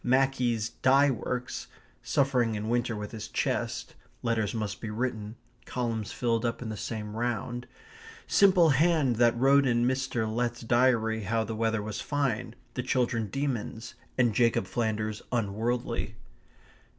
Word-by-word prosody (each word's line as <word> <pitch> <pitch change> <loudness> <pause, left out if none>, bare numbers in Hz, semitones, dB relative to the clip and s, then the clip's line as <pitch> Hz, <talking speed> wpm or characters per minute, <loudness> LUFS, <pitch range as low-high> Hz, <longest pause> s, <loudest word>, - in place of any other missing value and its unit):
Mackie's 125 -3 +2
dye 135 +4 +4
works, 125 0 -4 0.3
suffering 125 -5 +1
in 105 +1 -3
winter 120 -1 0
with 105 -1 -5
his 110 -1 -6
chest, - - -2 0.3
letters 115 -3 +1
must 105 -3 -4
be 110 - -4
written, 110 -1 -3 0.3
columns 115 -4 -2
filled 115 -2 0
up 120 -1 -1
in 115 - -5
the 110 - -4
same 105 0 -5
round, 120 +1 -2 0.6
simple 185 -4 +5
hand 150 -4 +3
that 120 0 +4
wrote 135 +2 +5
in 120 -1 +2
Mr. 130 -3 0
Letts's 120 +2 -1
diary 115 -2 +2
how 110 +3 0
the 110 +1 -4
weather 110 -1 0
was 105 -1 -4
fine, 125 -5 -1 0.2
the 125 - -2
children 125 -3 0
demons, 120 -2 -3 0.2
and 120 -3 +3
Jacob 115 -3 +3
Flanders 110 +1 -2
unworldly. 115 +1 -1
120 Hz, 140 wpm, -29 LUFS, 110-125 Hz, 0.6 s, simple